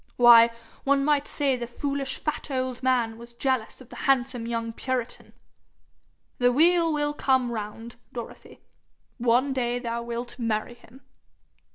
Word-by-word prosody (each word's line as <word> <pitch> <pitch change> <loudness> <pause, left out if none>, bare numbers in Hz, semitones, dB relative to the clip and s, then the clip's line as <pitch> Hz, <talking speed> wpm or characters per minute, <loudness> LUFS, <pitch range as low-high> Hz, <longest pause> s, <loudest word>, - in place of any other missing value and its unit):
Why, 235 -1 +8 0.3
one 275 0 +2
might 290 -1 +2
say 280 -3 +1
the 240 -1 -5
foolish 275 +2 -3
fat 305 0 -4
old 255 -2 -3
man 240 -3 +1
was 235 0 -12
jealous 260 -1 -2
of 255 - -15
the - - -11
handsome 250 -3 +1
young 230 -1 -3
puritan! 255 -1 -4 1.1
The 245 0 +4
wheel 335 +4 +4
will 295 -1 0
come 260 -4 +1
round, 225 +2 -6
Dorothy. 235 -2 -9 0.6
One 245 +3 +2
day 245 -2 -1
thou 235 -1 -3
wilt 235 +1 -6
marry 225 0 -2
him.' 240 +2 -18
245 Hz, 145 wpm, -26 LUFS, 235-270 Hz, 1.1 s, Why